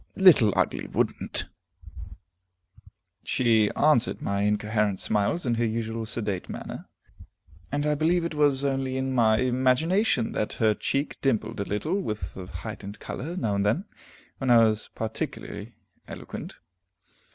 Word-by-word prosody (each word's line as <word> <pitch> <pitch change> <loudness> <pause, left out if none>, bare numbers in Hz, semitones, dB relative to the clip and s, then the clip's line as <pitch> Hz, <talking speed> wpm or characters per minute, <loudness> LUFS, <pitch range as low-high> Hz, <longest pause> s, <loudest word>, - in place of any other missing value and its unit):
Little 165 - +7
Ugly - - 0
would'nt! - - 0 1.8
She 115 -4 +3
answered 145 -5 +3
my 100 0 -1
incoherent 105 -1 +1
sallies 105 - 0
in 120 - +1
her 115 0 +1
usual 115 0 -3
sedate 105 -5 -3
manner, - - -7 0.8
and 145 +1 -1
I 150 - +2
believe 165 +3 +2
it 170 - -3
was 145 -2 +2
only 135 -1 -1
in 130 0 -1
my 110 -3 +4
imagination 130 - +2
that 105 - -2
her 110 -2 +2
cheek 140 +7 -2
dimpled 115 -4 0
a 100 - -1
little, 155 - -1
with 105 - -5
a 95 -1 -7
heightened 100 +2 -7
color, 165 +7 -5
now 110 - 0
and 100 0 +1
then, 115 - +1 0.5
when 135 - -1
I 120 - +7
was 110 0 -4
particularly 110 0 -5 0.3
eloquent. - - -8
115 Hz, 140 wpm, -26 LUFS, 105-140 Hz, 1.8 s, Little